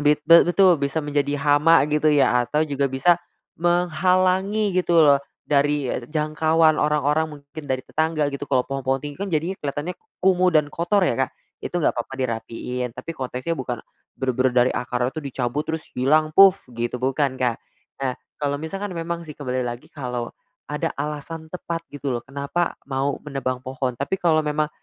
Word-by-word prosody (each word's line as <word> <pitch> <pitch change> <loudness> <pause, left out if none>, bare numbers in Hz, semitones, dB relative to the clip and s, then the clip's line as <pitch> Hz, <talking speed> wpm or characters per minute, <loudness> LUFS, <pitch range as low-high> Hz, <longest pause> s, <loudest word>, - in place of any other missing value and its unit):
bit 150 0 +4
be 170 +2 +7
betul 180 -4 +4
bisa 140 +3 0
menjadi 145 0 0
hama 145 +2 +5
gitu 150 +1 +2
ya, 135 -4 +4
atau 150 +6 +1
juga 140 -2 -1
bisa 165 +7 +3 0.4
menghalangi 185 +4 +2
gitu 175 -1 +1
loh, 140 -1 +5 0.2
dari 145 -1 +1
e 120 -1 -5
jangkauan 155 +1 +2
orang-orang 150 +1 +2
mungkin 140 +2 -10
dari 130 -1 -1
tetangga 155 -2 0
gitu, 140 +1 -5
kalau 130 -2 +2
pohon-pohon 135 -1 -1
tinggi 175 - -15
kan 200 - -2
jadinya 170 +3 -1
kelihatannya 145 +4 -3 0.3
kumuh 185 -1 +4
dan 150 -2 +2
kotor 180 +3 +2
ya, 120 - +1
Kak, 130 - 0 0.3
itu - - -7
nggak 170 - +2
apa-apa 120 +2 -5
dirapihin, 125 0 -3
tapi 165 - -6
konteksnya 130 +3 -4
bukan 125 -3 -3 0.4
benar-benar 130 -1 +1
dari - - +1
akar 125 0 -2
itu 155 - -5
dicabut 140 +1 -3
terus 160 0 -3
hilang 155 +5 +2
puf 195 +2 +6
gitu, 120 +1 -3
bukan 130 +1 0
Kak. 120 -2 0 0.4
Nah, 130 -1 0 0.3
kalau 145 -1 -1
misalkan 195 +4 -5
memang 170 0 -4
sih 150 - -8
kembali 130 -3 -3
lagi 120 0 -6
kalau 125 -4 -4 0.4
ada 150 - -2
alasan 155 +2 -5
tepat 170 -1 -4
gitu 140 -2 -4
loh, 120 - -3
kenapa 140 +5 -2
mau 135 0 -1
menebang 135 -3 -3
pohon, 130 -1 -3
tapi 140 +7 -1
kalau 160 -2 +3
memang 150 0 0
145 Hz, 170 wpm, -23 LUFS, 130-165 Hz, 0.4 s, be